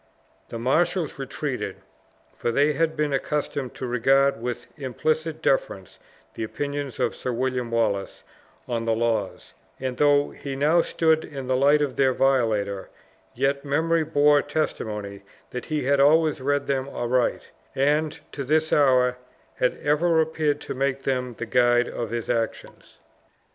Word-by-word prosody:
The 115 Hz, -, -5 dB
marshals 155 Hz, +5 st, 0 dB
retreated, 135 Hz, -, -4 dB, 0.6 s
for -, -, -3 dB
they 145 Hz, +5 st, +3 dB
had 160 Hz, +2 st, 0 dB
been 150 Hz, -1 st, 0 dB
accustomed 140 Hz, -1 st, -2 dB
to 130 Hz, -, -5 dB
regard 135 Hz, +1 st, +2 dB
with 120 Hz, 0 st, -4 dB
implicit 155 Hz, +4 st, -2 dB
deference 95 Hz, -8 st, -1 dB, 0.3 s
the -, -, -5 dB
opinion 140 Hz, +4 st, -4 dB
of -, -, 0 dB
Sir 125 Hz, -, -3 dB
William 125 Hz, 0 st, -1 dB
Wallace 110 Hz, -4 st, -1 dB, 0.4 s
on 115 Hz, -1 st, -2 dB
the 115 Hz, -1 st, +1 dB
laws; 110 Hz, -4 st, -2 dB, 0.3 s
and 130 Hz, -1 st, -3 dB
though 145 Hz, -1 st, +3 dB
he 140 Hz, -1 st, -6 dB
now 155 Hz, +5 st, +3 dB
stood 160 Hz, -1 st, +1 dB
in 135 Hz, -3 st, -7 dB
the 130 Hz, 0 st, +1 dB
light 145 Hz, +3 st, +4 dB
of 135 Hz, -3 st, -3 dB
their 130 Hz, -2 st, +3 dB
violator, 110 Hz, -7 st, +1 dB, 0.5 s
yet 135 Hz, +2 st, 0 dB
memory 160 Hz, +3 st, +1 dB
bore 145 Hz, -1 st, +4 dB
testimony 105 Hz, -9 st, -3 dB, 0.3 s
that 125 Hz, -, -5 dB
he 155 Hz, -2 st, -2 dB
had 140 Hz, +2 st, +2 dB
always 155 Hz, +1 st, +4 dB
read 145 Hz, +1 st, 0 dB
them 135 Hz, -1 st, -1 dB
aright, 125 Hz, -1 st, -1 dB, 0.3 s
and, 150 Hz, +3 st, +1 dB
to 140 Hz, -, -5 dB
this 155 Hz, +3 st, +1 dB
hour, 125 Hz, -3 st, +3 dB, 0.4 s
had 125 Hz, -, +1 dB
ever 160 Hz, +3 st, +3 dB
appeared 155 Hz, -2 st, 0 dB
to -, -, -5 dB
make 135 Hz, 0 st, -1 dB
them 125 Hz, -2 st, -2 dB
the 120 Hz, -, -4 dB
guide 120 Hz, +1 st, +3 dB
of 115 Hz, -2 st, -4 dB
his 115 Hz, 0 st, -4 dB
actions. 115 Hz, -2 st, -4 dB
135 Hz, 150 wpm, -24 LUFS, 120-150 Hz, 0.6 s, light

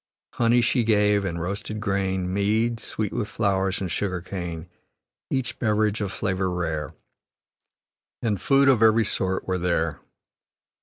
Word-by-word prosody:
Honey 120 Hz, +1 st, +3 dB
she 120 Hz, +1 st, +2 dB
gave, 105 Hz, -2 st, +3 dB
and 85 Hz, -2 st, -3 dB
roasted 100 Hz, +4 st, -4 dB
grain, 95 Hz, -3 st, -1 dB
Mead, 110 Hz, +4 st, +1 dB
sweet 110 Hz, -3 st, -3 dB
with 115 Hz, -4 st, -2 dB
flowers, 95 Hz, -3 st, 0 dB
and 95 Hz, -3 st, -3 dB
sugar 95 Hz, +2 st, -1 dB
cane. 85 Hz, -2 st, -6 dB, 0.6 s
Each 125 Hz, -3 st, -2 dB
beverage 110 Hz, -1 st, +1 dB
of 100 Hz, -2 st, -2 dB
flavor 95 Hz, -2 st, -1 dB
rare, 80 Hz, -4 st, -3 dB, 1.3 s
And 105 Hz, -5 st, 0 dB
food 140 Hz, 0 st, +4 dB
of 130 Hz, -5 st, +5 dB
every 110 Hz, 0 st, +5 dB
sort, 95 Hz, -2 st, -1 dB
were 95 Hz, -1 st, 0 dB
there. 85 Hz, -3 st, 0 dB
100 Hz, 140 wpm, -25 LUFS, 90-110 Hz, 1.3 s, of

